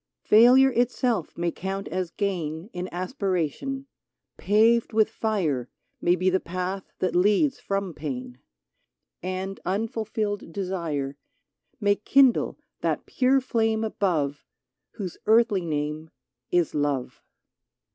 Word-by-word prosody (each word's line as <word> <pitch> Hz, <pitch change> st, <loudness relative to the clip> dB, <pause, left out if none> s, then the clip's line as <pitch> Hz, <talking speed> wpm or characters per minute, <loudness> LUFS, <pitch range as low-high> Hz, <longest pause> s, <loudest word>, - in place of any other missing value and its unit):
Failure 250 Hz, +5 st, +7 dB
itself 245 Hz, -, 0 dB
may 170 Hz, 0 st, 0 dB
count 195 Hz, +3 st, -4 dB
as 185 Hz, -1 st, -2 dB
gain 175 Hz, -1 st, -3 dB
In 180 Hz, +1 st, -4 dB
aspiration; 190 Hz, -, -2 dB, 0.5 s
paved 225 Hz, +3 st, +3 dB
with 220 Hz, 0 st, +3 dB
fire 165 Hz, -, -1 dB, 0.3 s
May 175 Hz, +1 st, +4 dB
be 185 Hz, +1 st, -1 dB
the 190 Hz, -, +2 dB
path 185 Hz, +2 st, -4 dB
that 185 Hz, -, -1 dB
leads 210 Hz, -, +3 dB
from 195 Hz, -3 st, -2 dB
pain; 130 Hz, -5 st, -6 dB, 0.8 s
And 185 Hz, +2 st, -4 dB
unfulfilled 215 Hz, -1 st, -2 dB
desire 165 Hz, -7 st, -3 dB, 0.6 s
May 205 Hz, -2 st, +2 dB
kindle 270 Hz, -3 st, +3 dB, 0.2 s
that -, -, -1 dB
pure 265 Hz, +1 st, +3 dB
flame 225 Hz, -3 st, 0 dB
above 160 Hz, -10 st, -1 dB, 0.5 s
Whose 190 Hz, -6 st, -6 dB
earthly 215 Hz, -5 st, +4 dB
name 150 Hz, +1 st, -3 dB, 0.4 s
is 175 Hz, -2 st, +1 dB
love! 145 Hz, -4 st, -1 dB
190 Hz, 110 wpm, -26 LUFS, 165-220 Hz, 0.8 s, Failure